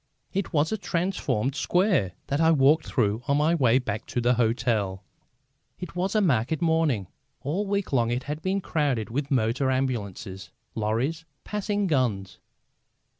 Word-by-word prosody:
It 195 -1 -2
was 155 +1 +1
a 220 - -1
transformed 170 - -1
square 175 - +1
that 140 +3 -1
I 160 - +5
walked 155 0 +4
through 110 -2 0
on 140 0 +3
my 155 +3 +3
way 130 -7 +4
back 110 -5 -3
to - - -2
the 120 +1 +3
hotel. 110 -5 0 0.8
It 180 -1 -7
was 190 +4 -1
a 215 - +4
market 140 - +1
morning. 160 - +1 0.4
All 180 +9 -2
week 200 -5 -1
long 120 -3 +2
it 120 +2 -1
had 150 +2 -5
been 190 +3 0
crowded 140 - -1
with 140 +3 -2
motor 130 +1 +1
ambulances, 110 -7 -3 0.2
lorries, 115 +9 -1 0.2
passing 205 0 -1
guns. 115 - 0
135 Hz, 155 wpm, -26 LUFS, 115-165 Hz, 0.8 s, I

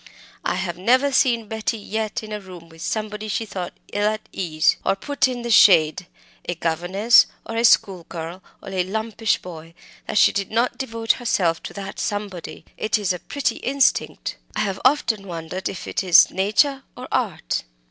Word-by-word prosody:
I - - 0
have 180 -2 -3
never 255 +8 +3
seen 240 -5 +2
Betty 220 +1 -2
yet 215 +1 -3
in 215 - -9
a 210 - -3
room 180 -3 -12
with 165 0 -15
somebody 215 +2 -3
she 220 +2 -2
thought 185 -4 -6 0.2
ill 205 0 +1
at 215 0 -3
ease, 160 -3 +1
or - - +2
put 285 +6 0
in 245 -2 -4
the 235 - -2
shade 170 -4 +5 0.4
a 175 - -1
governess, 175 +8 +3 0.2
or 225 - -6
a 230 - +1
schoolgirl, 180 -5 +1 0.2
or - - -8
a 190 -1 0
lumpish 220 +3 -1
boy 165 -2 -10 0.3
that - - -2
she - - +6
did 195 -1 -2
not 235 +3 0
devote 225 -3 0
herself 180 -9 0
to - - -8
that 195 -1 -7
somebody. 205 -6 -4
It 215 - +1
is 200 -3 0
a 180 - -6
pretty 285 +8 -2
instinct; 270 +1 0 0.2
I - - 0
have 195 -2 -2
often 235 -7 +2
wondered 170 +2 -5
whether - - -6
it - - -1
is 180 -2 +7
nature 215 +9 +2 0.2
or 250 - -7
art." 230 -10 -1
205 Hz, 180 wpm, -22 LUFS, 180-225 Hz, 0.4 s, is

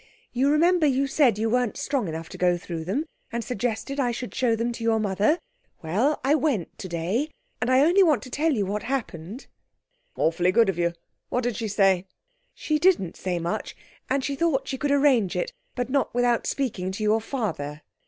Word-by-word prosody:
You 260 +3 +2
remember 330 +2 +4
you 275 0 +2
said 270 -5 +3
you 220 +1 0
weren't 245 -1 0
strong 270 -8 -1
enough 160 0 -5
to - - -9
go 180 -1 +3
through 170 -2 -6
them, 260 - -1 0.3
and 235 0 -2
suggested 245 +4 -3
I 245 -3 +2
should 245 +1 -5
show 245 -3 +2
them 230 +2 -1
to 235 -1 -6
your 225 -1 +2
mother? 210 - +2 0.5
Well, 220 - +1
I 275 +3 +3
went 270 - 0
today, 185 - -2 0.3
and 220 - 0
I 255 +1 +5
only 345 +7 +5
want 315 -8 +4
to 255 - -10
tell 315 +4 +1
you 215 -8 0
what 205 +2 -2
happened.' 230 - -4 0.7
'Awfully 175 +3 +2
good 230 0 +4
of 180 -3 -2
you. 170 0 +1 0.4
What 250 - 0
did 240 -2 -1
she 225 - -3
say?' 195 -2 +2 0.5
'She 305 -1 -1
didn't 330 - +3
say 180 -2 -2
much, 170 0 -3 0.3
and 270 0 +1
she 280 - -2
thought 275 -3 0
she 265 - -4
could 290 - 0
arrange 275 -10 +3
it, 180 - -2 0.2
but 245 -2 -1
not 275 -3 0
without 245 -1 +2
speaking 205 -9 -2
to 215 - -4
your 215 +1 +3
father.' 160 - -4
235 Hz, 200 wpm, -25 LUFS, 190-275 Hz, 0.7 s, I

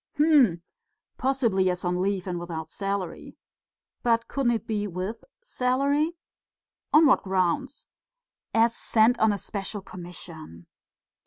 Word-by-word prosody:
"Hm!... 275 - +4 0.6
Possibly 230 -9 +2
as 180 0 -3
on 180 0 0
leave 195 -1 -1
and 180 -2 -3
without 160 -2 -6
salary...." 195 -3 -4 0.6
"But 230 -1 +1
couldn't 260 -4 +1
it 225 -2 -3
be 210 -2 -2
with 185 +4 -5 0.2
salary?" 285 - 0 0.8
"On 310 +2 +7
what 285 - +5
grounds?" 190 +9 -1 0.6
"As 230 +1 +3
sent 230 +2 +3
on 220 -1 +4
a 205 - -1
special 200 0 -5
commission." 170 - -9
205 Hz, 120 wpm, -26 LUFS, 180-250 Hz, 0.8 s, On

